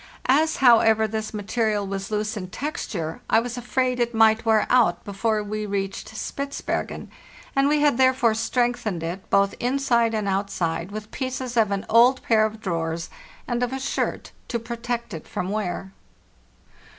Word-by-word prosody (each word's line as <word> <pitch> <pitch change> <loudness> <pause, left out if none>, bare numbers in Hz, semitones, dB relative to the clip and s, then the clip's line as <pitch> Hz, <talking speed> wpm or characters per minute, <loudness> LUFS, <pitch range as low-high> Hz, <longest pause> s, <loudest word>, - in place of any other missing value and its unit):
As, 310 +4 +3
however, 225 -3 +5
this 220 0 -4
material 210 0 -1
was 195 0 -4
loose 215 +1 -1
in 185 -3 -5
texture, 185 - -4
I 225 - +5
was 240 0 -4
afraid 250 +1 -1
it 235 -1 0
might 225 +1 +4
wear 220 -1 +4
out 220 -9 +3
before 210 +2 -1
we 210 +1 -4
reached 195 +2 -4
Spitzbergen, 280 +5 -4 0.4
and 275 0 +4
we 300 0 +2
had 290 -4 +3
therefore 260 -3 +4
strengthened 225 -5 -1
it 175 +3 -5
both 200 0 +3
inside 240 -3 +1
and 210 -2 -1
outside 190 -3 -1
'with 215 +1 -7
pieces 255 -2 -4
of 225 -3 +3
an 200 -1 -2
old 245 +3 +5
pair 220 -1 +4
of 220 0 -10
drawers 165 -4 -3 0.4
and 240 -1 -1
of 245 0 0
a 265 - -3
shirt 265 - -2 0.2
to 235 - -1
protect 235 +1 -4
it 160 - -7
from 180 - -3
wear. 195 -2 -3
220 Hz, 160 wpm, -24 LUFS, 200-245 Hz, 0.4 s, however